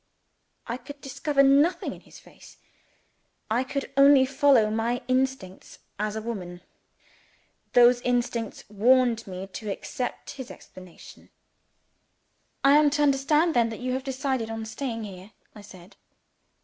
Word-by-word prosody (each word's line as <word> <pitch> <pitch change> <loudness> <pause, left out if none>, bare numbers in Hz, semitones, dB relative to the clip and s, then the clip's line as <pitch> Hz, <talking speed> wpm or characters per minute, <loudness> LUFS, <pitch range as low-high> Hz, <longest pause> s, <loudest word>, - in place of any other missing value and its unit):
I 235 +1 -4
could 285 +3 -12
discover 275 +1 0
nothing 290 +6 +3
in - - -14
his - - -16
face - - -17 0.9
I 240 +3 +2
could 275 +1 -5
only 275 -1 +6
follow 265 -5 +3
my 230 +3 -1
instincts 255 -7 -2 0.2
as 210 0 -2
a 220 - -5
woman. 180 -6 -6 1.1
Those 245 0 +6
instincts 240 -2 -2
warned 230 +2 +2
me 185 0 -6
to 200 +3 -8
accept 245 +5 -5
his 260 -3 -9
explanation. 185 -2 -14 1.3
"I 280 +1 +6
am 300 -1 +4
to 295 +1 0
understand 295 +4 +2
then 235 -3 +2
that 225 - -7
you 255 0 -3
have 260 +1 -3
decided 265 -3 -2
on 225 0 -5
staying 230 0 -5
here?" 195 0 -10 0.2
I 210 - -12
said. 185 -2 -15
245 Hz, 135 wpm, -26 LUFS, 220-275 Hz, 1.3 s, only